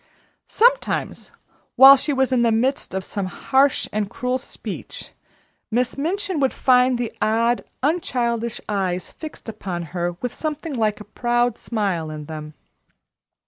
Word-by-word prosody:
Sometimes, - - +1 0.5
while 270 +1 +10
she 285 +3 -1
was 265 -1 +1
in 250 -2 +3
the 235 -1 +3
midst 240 -2 0
of 190 0 -3
some 200 -2 -3
harsh 265 +8 +2
and 210 -1 -1
cruel 255 +1 -2
speech, - - -8 0.6
Miss 240 +2 0
Minchin 360 +4 -1
would 270 -2 +2
find 250 -1 +4
the 240 -2 -3
odd, 230 +2 +2 0.2
unchildish 235 -7 0
eyes 185 -3 -2
fixed 310 -5 -10
upon 190 -5 -5
her 175 -1 -1
with 240 +8 -5
something 310 0 -4
like 215 -4 0
a 210 0 -14
proud 240 -1 +1
smile 195 -8 -2
in 155 -1 -7
them. 155 0 -8
240 Hz, 145 wpm, -22 LUFS, 205-265 Hz, 0.6 s, while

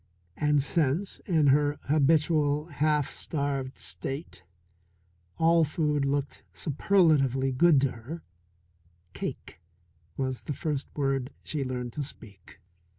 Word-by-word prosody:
And 150 -2 +2
since, 165 +5 0
in 160 -6 +3
her 145 0 +2
habitual 150 0 +2
half 150 -1 +1
starved 140 -3 -3
state, 135 - -5 1.0
all 165 0 +4
food 150 -2 0
looked 140 0 -2
superlatively 145 -5 +2
good 150 +3 +5
to 135 -2 +1
her, 135 +9 -8 0.9
cake 80 - -6 0.6
was 130 -2 -2
the 145 - -2
first 145 0 -3
word 135 -2 0
she 150 -3 -2
learned 125 -2 -4
to 150 - -3
speak. 105 - -11
145 Hz, 110 wpm, -28 LUFS, 135-155 Hz, 1.0 s, good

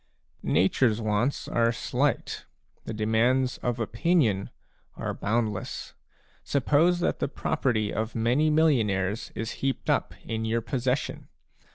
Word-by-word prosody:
Nature's 110 +4 +2
wants 110 +5 0
are 115 0 +2
slight; 115 - -1 0.4
the - - -4
demands 115 +4 +1
of 120 -1 -2
opinion 115 - +1 0.5
are - - -3
boundless. 110 0 -2 0.5
Suppose 155 +5 +2
that - - 0
the - - 0
property 125 -7 -1
of 110 +1 -3
many 120 +7 +2
millionaires 110 -11 +2
is 115 +1 -3
heaped 135 -1 0
up - - 0
in 110 0 -3
your 115 +1 0
possession. 130 +2 -2
115 Hz, 115 wpm, -27 LUFS, 110-135 Hz, 0.5 s, Nature's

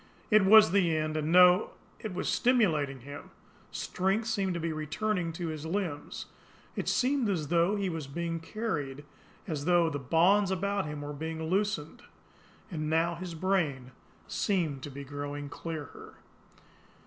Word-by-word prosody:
It 215 -1 +6
was 215 -2 +8
the 175 -5 +3
end, 155 0 -1
and 155 +1 -1
no! 180 +2 +6 0.3
It 215 - -5
was 180 - -3
STIMULATING 155 - +2
him! 145 +3 -9 0.4
Strength 195 +5 -1
seemed 195 -5 -1
to - - -2
be 165 -1 -2
returning 170 +4 -2
to 170 0 -4
his 155 -1 -5
limbs; 165 -3 -3 0.5
it - - -2
seemed 260 -3 +1
as 160 -7 -1
though 170 +4 +3
he 200 -2 -1
were 165 -3 -3
being 170 +2 -3
carried, 150 -8 -4 0.4
as 150 -5 -3
though 175 -2 +3
the 145 - -3
bonds 180 +8 +3
about 195 -1 -1
him 150 -1 -5
were 145 0 -5
being 160 +2 -5
loosened; 185 -2 -1 0.7
and 155 -3 -3
now 165 +2 +2
his 170 0 -6
brain 155 -8 0 0.4
seemed 165 -9 -1
to 145 - -6
be 140 +1 -8
growing 145 +1 -5
clearer. 155 -2 -7
165 Hz, 155 wpm, -30 LUFS, 150-195 Hz, 0.7 s, was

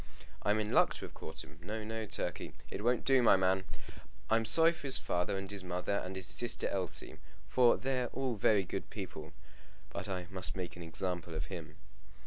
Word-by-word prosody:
I'm 105 +2 +2
in 105 0 -1
luck - - +5
to - - -5
have - - -11
caught 80 0 -7
him. 75 +2 -15
No, 110 +5 -4
no, 110 0 -3
Turkey; 90 -4 -3 0.2
it 100 - -4
won't 120 +1 +2
do, 135 -1 +5
my 110 -4 +7
man. 95 0 +2 0.7
I'm 115 0 +4
sorry 165 +9 +6
for 160 -4 -7
his 135 - +2
father 90 +2 0
and 95 +1 -5
his 100 -2 -4
mother, 90 +2 -1
and 95 +1 -5
his 95 -1 -1
sister 120 +5 +2
Elsie, 95 -3 -2 0.3
for 125 -2 +5
they're 130 -1 0
all 130 0 -1
very 105 -1 +4
good 90 - -4
people; 75 0 -6 0.6
but - - -5
I 90 -2 -2
must 95 -1 -1
make 90 -2 -4
an 90 - -9
example 85 0 -3
of 75 -1 -2
him." 80 -3 -7
95 Hz, 200 wpm, -34 LUFS, 90-115 Hz, 0.7 s, my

